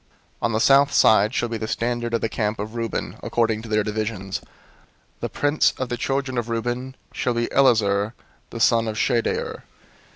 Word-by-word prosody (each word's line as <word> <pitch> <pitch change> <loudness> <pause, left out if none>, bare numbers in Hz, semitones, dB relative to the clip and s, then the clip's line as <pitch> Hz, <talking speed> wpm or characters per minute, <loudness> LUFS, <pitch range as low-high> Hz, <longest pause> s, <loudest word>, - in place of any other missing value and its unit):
002:010 - - -39 0.3
"On 115 - +1
the 110 - +1
south 140 +4 +5
side 110 -1 +5
shall 120 - -1
be 115 -1 -4
the 110 - -3
standard 120 +1 -1
of 115 - -1
the - - +1
camp 110 0 -2
of 105 +2 -5
Reuben 115 -1 -3
according 115 -2 0
to 115 - -10
their 105 -1 +2
divisions. 105 -2 -3 0.8
The - - -3
prince 145 +1 +2
of 130 -2 -3
the 120 - -1
children 135 0 -1
of 120 0 -4
Reuben 120 +3 -3 0.2
shall 125 - -1
be 120 0 +1
Elizur 110 -5 +3 0.4
the 115 - -7
son 115 0 +3
of 110 -1 -3
Shedeur. 120 -1 0
115 Hz, 190 wpm, -23 LUFS, 110-120 Hz, 0.8 s, south